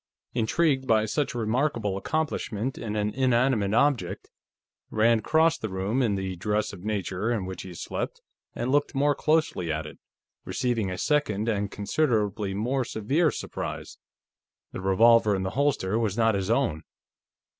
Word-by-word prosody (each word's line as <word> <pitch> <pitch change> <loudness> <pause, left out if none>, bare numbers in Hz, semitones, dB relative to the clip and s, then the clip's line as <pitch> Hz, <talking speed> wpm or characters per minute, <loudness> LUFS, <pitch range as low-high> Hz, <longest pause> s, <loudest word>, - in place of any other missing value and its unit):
Intrigued 135 +3 +1
by 110 -2 +3
such 135 +4 -1
a - - -2
remarkable 115 -2 0
accomplishment 130 -2 -2
in 110 -2 -5
an 105 0 -1
inanimate 125 -5 +2
object, 140 +1 +1 0.6
Rand 110 +1 +3
crossed 160 +1 +3
the 110 - -3
room 95 +7 -1
in 110 -5 +1
the 95 -1 -3
dress 105 +4 -1
of 90 -2 -10
nature 105 0 -2
in 110 -6 -1
which 95 -1 -6
he 90 -2 -9
slept - - -4 0.4
and 125 - -2
looked 145 0 +1
more 145 +2 +3
closely 155 - +1
at 80 0 -2
it, 75 - -10 0.4
receiving 115 +1 -1
a 90 - -4
second 110 -6 0
and 100 -3 0
considerably 105 -3 0
more 125 +6 0
severe 140 +10 +1
surprise. - - -6 0.7
The - - -6
revolver 110 +2 +5
in 95 - -2
the 95 - -2
holster 130 -7 +1
was 110 -3 -1
not 115 -1 +3
his 100 0 -2
own. 115 - +1
110 Hz, 155 wpm, -26 LUFS, 100-130 Hz, 0.7 s, revolver